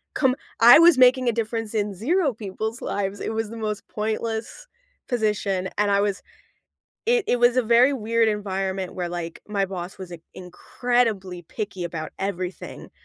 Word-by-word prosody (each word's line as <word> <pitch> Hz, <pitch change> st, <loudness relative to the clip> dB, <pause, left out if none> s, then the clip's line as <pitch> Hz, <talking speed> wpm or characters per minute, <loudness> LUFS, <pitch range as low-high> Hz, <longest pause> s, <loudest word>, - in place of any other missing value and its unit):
Come 265 Hz, -3 st, +2 dB, 0.2 s
I 235 Hz, +2 st, +9 dB
was 335 Hz, -4 st, +7 dB
making 255 Hz, 0 st, +5 dB
a 235 Hz, -, 0 dB
difference 225 Hz, -1 st, -3 dB
in 205 Hz, -1 st, -1 dB
0 285 Hz, -, +1 dB
people's 220 Hz, +3 st, -5 dB
lives. 200 Hz, 0 st, -3 dB
It -, -, -3 dB
was 220 Hz, -1 st, -2 dB
the 230 Hz, -, -8 dB
most 215 Hz, -1 st, -4 dB
pointless 220 Hz, -, -4 dB, 0.4 s
position, 210 Hz, -5 st, -1 dB
and 210 Hz, 0 st, +2 dB
I 200 Hz, 0 st, +3 dB
was 200 Hz, -1 st, -1 dB, 0.9 s
it 475 Hz, -2 st, +3 dB
it 245 Hz, -, +1 dB
was 240 Hz, +1 st, +4 dB
a 255 Hz, -, +4 dB
very 235 Hz, +4 st, +5 dB
weird 230 Hz, -2 st, +1 dB
environment 195 Hz, -2 st, -3 dB
where, 180 Hz, -1 st, -3 dB
like, 170 Hz, -1 st, -6 dB
my 200 Hz, -2 st, 0 dB
boss 185 Hz, 0 st, -7 dB
was 185 Hz, -2 st, -8 dB
in 165 Hz, -, -9 dB
incredibly 195 Hz, 0 st, -2 dB
picky 195 Hz, +1 st, -6 dB
about 165 Hz, -2 st, -5 dB
everything. 185 Hz, -2 st, -5 dB
210 Hz, 165 wpm, -24 LUFS, 190-240 Hz, 0.9 s, I